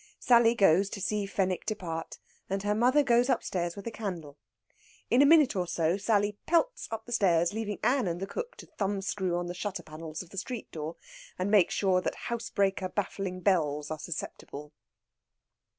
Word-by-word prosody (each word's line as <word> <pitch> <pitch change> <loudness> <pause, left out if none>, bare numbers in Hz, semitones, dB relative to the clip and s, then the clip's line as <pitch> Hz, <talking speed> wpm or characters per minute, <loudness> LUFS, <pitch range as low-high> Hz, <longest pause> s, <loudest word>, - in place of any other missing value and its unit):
Sally 235 -1 +5
goes 195 -2 +4
to 200 - -6
see 200 +1 -1
Fenwick 190 -2 -1
depart, 170 -7 -4 0.3
and 195 0 -2
her 205 0 +1
mother 250 +7 +4
goes 240 0 +3
upstairs 175 -8 -1
with 200 - -9
a 230 - -3
candle. 175 - -6 0.7
In 245 +3 +6
a 285 - +7
minute 305 -6 +6
or 180 -2 -1
so 170 0 +1
Sally 205 0 +1
pelts - - +1
up 225 0 -5
the 240 - -11
stairs, 175 -6 +3
leaving 210 -2 -3
Ann 255 -4 +2
and 170 0 -2
the 195 - -3
cook 480 - -5
to - - -10
thumbscrew 195 -2 -2
on 175 - -2
the 175 - -4
shutter 185 -1 -4
panels 155 +1 -7
of 170 - -19
the 195 - -3
street 240 +4 -6
door, 155 +1 -5 0.4
and 185 +2 -1
make 200 -5 +5
sure 185 -2 +2
that - - -2
housebreaker 200 -5 -1
baffling 190 -2 -3
bells 150 -6 +1
are 155 - -4
susceptible. 150 -2 -7
195 Hz, 180 wpm, -29 LUFS, 175-220 Hz, 0.7 s, a